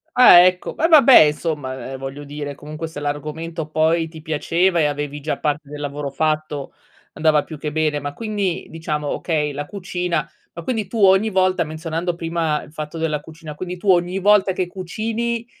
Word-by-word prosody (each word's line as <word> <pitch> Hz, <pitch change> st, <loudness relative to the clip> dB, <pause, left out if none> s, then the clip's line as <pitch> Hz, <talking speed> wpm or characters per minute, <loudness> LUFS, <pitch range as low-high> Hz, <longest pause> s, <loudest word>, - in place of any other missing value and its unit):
Ah, 250 Hz, -8 st, +9 dB
ecco. 180 Hz, 0 st, +2 dB
Va 325 Hz, -, +1 dB
vabbè 290 Hz, -5 st, +7 dB
insomma, 145 Hz, -4 st, -1 dB
ehm, 135 Hz, -, -5 dB
voglio 135 Hz, +2 st, -6 dB
dire 145 Hz, 0 st, -6 dB
comunque 155 Hz, +3 st, -7 dB
se 155 Hz, -2 st, -8 dB
l'argomento 155 Hz, +2 st, -4 dB
poi 160 Hz, +1 st, +1 dB
ti 160 Hz, -1 st, -11 dB
piaceva 170 Hz, +3 st, +1 dB
e 150 Hz, -, +3 dB
avevi 145 Hz, 0 st, -3 dB
già 155 Hz, -, -2 dB
parte 150 Hz, -1 st, -2 dB
del 150 Hz, 0 st, -8 dB
lavoro 145 Hz, 0 st, -4 dB
fatto 155 Hz, -1 st, -2 dB, 0.4 s
andava 155 Hz, -1 st, +2 dB
più 155 Hz, -, -9 dB
che 150 Hz, 0 st, -4 dB
bene. 155 Hz, -1 st, 0 dB
Ma 145 Hz, 0 st, -5 dB
quindi 205 Hz, -4 st, -2 dB
diciamo, 155 Hz, -2 st, -3 dB
okay 150 Hz, -3 st, -1 dB
la 145 Hz, +1 st, -5 dB
cucina, 180 Hz, -5 st, -3 dB, 0.3 s
ma 170 Hz, -, -8 dB
quindi 220 Hz, -3 st, -2 dB
tu 230 Hz, -, -6 dB
ogni 190 Hz, +3 st, +5 dB
volta 185 Hz, -2 st, +2 dB
menzionando 165 Hz, +2 st, -3 dB
prima 165 Hz, -2 st, -1 dB
il 150 Hz, -, -15 dB
fatto 155 Hz, +1 st, -6 dB
della 160 Hz, -2 st, -1 dB
cucina, 160 Hz, 0 st, -10 dB
quindi 180 Hz, +2 st, -6 dB
tu 195 Hz, +2 st, -2 dB
ogni 175 Hz, +1 st, +1 dB
volta 200 Hz, -1 st, +4 dB
che 185 Hz, 0 st, -1 dB
cucini, 225 Hz, +6 st, -3 dB
160 Hz, 185 wpm, -21 LUFS, 150-180 Hz, 0.4 s, Ah